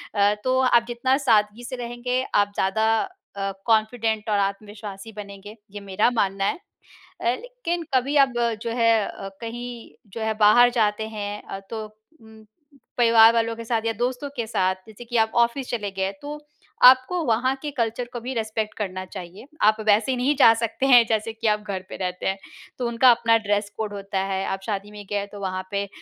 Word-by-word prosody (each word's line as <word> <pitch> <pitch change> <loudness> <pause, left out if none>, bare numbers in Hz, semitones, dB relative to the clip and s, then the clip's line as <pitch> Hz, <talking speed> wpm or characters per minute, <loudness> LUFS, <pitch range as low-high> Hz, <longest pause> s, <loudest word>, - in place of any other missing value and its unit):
अ, 205 0 +4
तो 255 0 +2
आप 240 -2 +4
जितना 255 +3 +1
सादगी 220 -4 +2
से 250 +2 -5
रहेंगे 245 +1 -2
आप 205 0 +3
ज़्यादा 220 +4 +1 0.4
अ, 195 0 -2
कॉन्फिडेंट 220 -1 +1
और 205 - +2
आत्मविश्वासी 205 +1 -5
बनेंगे, 205 0 -10 0.2
ये 205 - -7
मेरा 200 +3 +1
मानना 195 -3 0
है। - - 0 0.6
अ, - - -5 0.2
लेकिन 475 -9 -4
कभी 265 +3 +1
अब 265 - -11 0.3
जो 230 - -3
है 230 -1 +4 0.2
अ, 195 - -7
कहीं 240 +1 -7 0.2
जो 230 - -5
है 220 0 0
बाहर 230 +4 +7
जाते 215 0 +1
हैं 205 0 -4
अ, 195 - -7
तो 220 -1 -5 0.4
उम 220 -1 -16 0.5
परिवार 230 -1 +7
वालों 230 0 0
के 230 - -7
साथ 225 -1 0
या 225 - +1
दोस्तों 250 +5 -2
के 235 - -2
साथ 185 -4 +1
जैसे 220 +2 -12
कि 240 0 -2
आप 220 0 +2
ऑफिस 245 +2 -3
चले 210 -4 -2
गए 190 0 -2
तो 295 +1 -6 0.5
आपको 260 +7 +6
वहाँ 250 +3 +1
के 300 - -4
कल्चर 235 -2 -2
को 240 - -4
भी 255 +3 -4
रिस्पेक्ट 220 -2 -2
करना 185 -3 -4
चाहिए। 185 +3 -10 0.2
आप 215 +1 +4
वैसे 215 +5 +3
नहीं 260 +4 +1
जा 230 -4 +8
सकते 230 +3 -1
हैं 245 -3 +7
जैसे 220 0 0
कि 225 0 -3
आप 210 0 +2
घर 190 -1 -4
पे - - -7
रहते 180 -1 -4
हैं। 190 +1 0 0.4
तो 245 - -1
उनका 235 +2 +5
अपना 230 -1 +3
ड्रेस 205 0 0
कोड 215 -2 -3
होता 195 -1 -4
है 190 0 -1
आप 195 0 -3
शादी 205 -1 -4
में 205 -1 -10
गए 205 -1 -1
तो 205 - -9
वहाँ 185 -1 -3
पे 200 0 -1
220 Hz, 195 wpm, -24 LUFS, 205-240 Hz, 0.6 s, जा